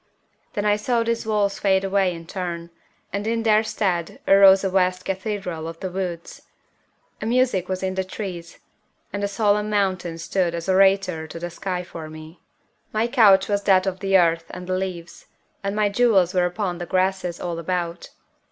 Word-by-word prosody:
Then 210 -2 -2
I 210 0 +3
saw 230 +2 0
these 230 -1 -2
walls 205 -2 0
fade 190 -1 +2
away 195 -1 +1
in 165 -1 -8
turn, 170 -2 -5 0.4
and 200 +2 -2
in 230 0 0
their 215 -1 +4
stead 195 -6 -2
arose 195 0 +7
a 195 - +1
vast 185 -1 +1
cathedral 190 -4 -3
of 165 0 -8
the 185 - -4
woods. 175 -2 -5 0.8
A 215 - -3
music 240 -7 +1
was 185 0 -3
in 190 0 -1
the 190 0 -1
trees, 185 -3 -7 0.6
and 205 0 -3
a - - +2
solemn 210 0 +1
mountain 185 -5 -1
stood 170 +1 -1
as 170 +1 -5
orator 190 -4 +3
to 165 - -9
the 175 +1 -5
sky 180 +1 -4
for 165 -3 -9
me. 155 +2 -11 0.5
My 220 +1 +1
couch 215 -6 +5
was 205 -1 0
that 190 -1 +4
of 190 -1 -2
the 195 -1 +3
earth 165 -2 +2
and 180 0 -8
the 185 - -2
leaves, 180 -2 -5 0.4
and 200 +1 -2
my 210 -1 +2
jewels 200 -5 +3
were 180 -1 +2
upon 180 -1 -3
the 175 - -5
grasses 185 -2 0
all 170 -1 -4
about. 170 0 -3
190 Hz, 185 wpm, -23 LUFS, 175-205 Hz, 0.8 s, arose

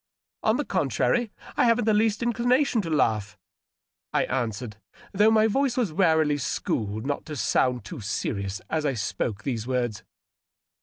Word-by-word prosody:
" - - -68
On - - +3
the - - -2
contrary, 240 -3 0 0.2
I - - +3
haven't 230 -1 +3
the 220 - +3
least 215 +1 +2
inclination 240 +1 +2
to 170 - -5
laugh," 110 -9 0 0.7
I - - +2
an 120 -3 0
swered, 110 0 -7 0.3
though 210 +2 +4
my 220 0 +4
voice 260 +3 +1
was 220 -10 0
warily 160 -4 +3
schooled 110 -4 -2
not 145 0 -2
to 155 - -5
sound 125 -1 +1
too 165 -9 -7
serious 100 -1 -3
as 160 -1 -1
I 140 -3 0
spoke 100 0 -3
these 120 -4 -3
words. 120 -5 -1
150 Hz, 165 wpm, -26 LUFS, -, 0.7 s, though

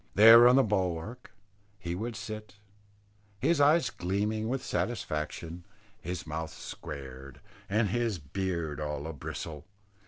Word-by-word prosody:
There 115 +3 +10
on 125 - +6
the 135 - +6
bulwark 100 +3 -2 0.5
he 90 -3 -4
would 110 +6 -4
sit, 105 -2 -7 0.8
his 145 - +2
eyes 155 +4 +4
gleaming 105 +4 -1
with 130 +1 -2
satisfaction, 85 -5 -3 0.4
his 90 +1 -5
mouth 80 +1 -4
squared, 70 -2 -8 0.3
and 105 +1 +2
his 115 -1 0
beard 85 -1 -3
all 75 -1 -3
a 80 - -4
bristle. 75 +1 -7
95 Hz, 125 wpm, -30 LUFS, 80-110 Hz, 0.8 s, There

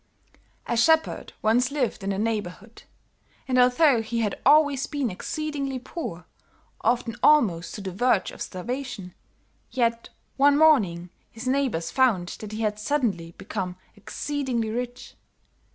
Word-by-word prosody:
"A 240 - -1
shepherd 320 +7 +2
once 240 +3 +3
lived 270 -7 -2
in 195 - -2
the 195 - -1
neighborhood, 215 0 -4 0.7
and 255 -1 +2
although 250 0 +5
he 230 +1 -2
had 210 -3 -2
always 290 -1 +4
been 280 -6 -2
exceedingly 280 - -3
poor, 240 - -7 0.6
often 235 -2 +1
almost 205 - +3
to 210 - -6
the 190 -1 -5
verge 220 +1 +1
of - - -12
starvation, 225 -2 -5 0.6
yet, 235 -2 0 0.3
one 285 +1 +5
morning, 195 - +3 0.2
his 230 +3 -8
neighbors 255 -12 0
found 220 -10 +2
that 215 -1 -8
he 215 +1 -4
had 210 -1 -1
suddenly 210 - -1
become 180 -1 -4 0.2
exceedingly 245 +1 -3
rich. 245 +1 -5
235 Hz, 135 wpm, -25 LUFS, 205-275 Hz, 0.7 s, although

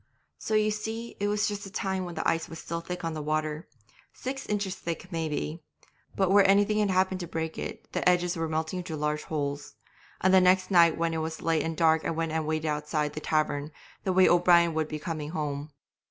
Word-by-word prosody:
'So 220 - -1
you 215 0 +3
see 225 +2 -5
it 205 - 0
was 210 0 +1
just 205 -1 -4
the 195 - -7
time 190 -1 -2
when 175 -1 -7
the - - -1
ice 165 - 0
was 165 - -8
still 170 +1 -4
thick 180 +1 -6
on 165 - -2
the 155 - -4
water, 155 +1 -2 0.4
six 270 +1 -6
inches 205 -2 -1
thick 180 0 -6
maybe, 160 0 -3 0.5
but 190 -1 +2
where 200 0 +7
anything 205 +2 +4
had 210 -1 +2
happened 185 0 +1
to 175 - -5
break 160 0 -4
it - - -6
the - - +3
edges 180 0 +2
were 165 -1 -2
melting 160 +3 -2
into 175 -3 -5
large 150 0 -1
holes. 145 -2 -3 0.4
And 190 0 +3
the 190 - +7
next 185 +1 +3
night 170 -3 +6
when 165 0 0
it - - -1
was 160 0 -4
late 165 -1 +2
and 160 -1 -3
dark 160 -1 +4
I - - -1
went 165 0 -1
and 160 -1 -1
waited 155 0 -1
outside 150 0 -1
the - - -4
tavern, 155 -1 0 0.3
the 190 - 0
way 185 0 +5
O'Brien 175 -1 +5
would 155 -1 0
be 155 - -4
coming 155 -2 -4
home. 150 -2 -3
165 Hz, 225 wpm, -28 LUFS, 155-190 Hz, 0.5 s, where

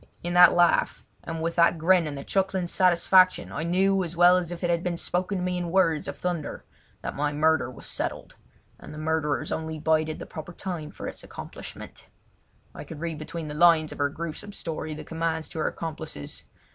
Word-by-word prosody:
In 175 0 -2
that 180 -1 +8
laugh 175 0 +3 0.2
and 165 -1 -5
with 165 0 -1
that 170 0 +5
grin 170 +1 +3
and 145 -2 -5
the 140 - -6
chuckling 190 0 0
satisfaction 185 +1 +4
I 155 - -4
knew 190 +3 +2
as 170 -1 -5
well 175 +1 +7
as 175 -2 -1
if 175 0 -6
it 175 - +1
had 170 -1 +1
been 175 -1 -2
spoken 185 +3 -1
to 180 - -2
me 180 0 -1
in 175 -1 -3
words 165 -5 +2
of 145 - -5
thunder 175 -4 -4 0.4
that - - -4
my 145 +1 0
murder 155 -3 +2
was 130 - -11
settled, - - -4 0.4
and - - -10
the - - -9
murderers 155 -1 -1
only 160 0 -3
bided 155 0 +1
the - - -7
proper 160 +2 -8
time 175 -5 -5
for - - -8
its - - -7
accomplishment. - - -10 0.7
I - - -8
could 155 - -9
read 165 -2 -4
between 155 +1 -6
the 150 - -5
lines 160 -1 +4
of - - -9
her 145 0 +2
gruesome 170 +6 -6
story 155 -3 -4
the - - -7
commands 160 -1 -2
to 160 - -6
her - - +1
accomplices. 155 - -6
165 Hz, 210 wpm, -26 LUFS, 155-175 Hz, 0.7 s, that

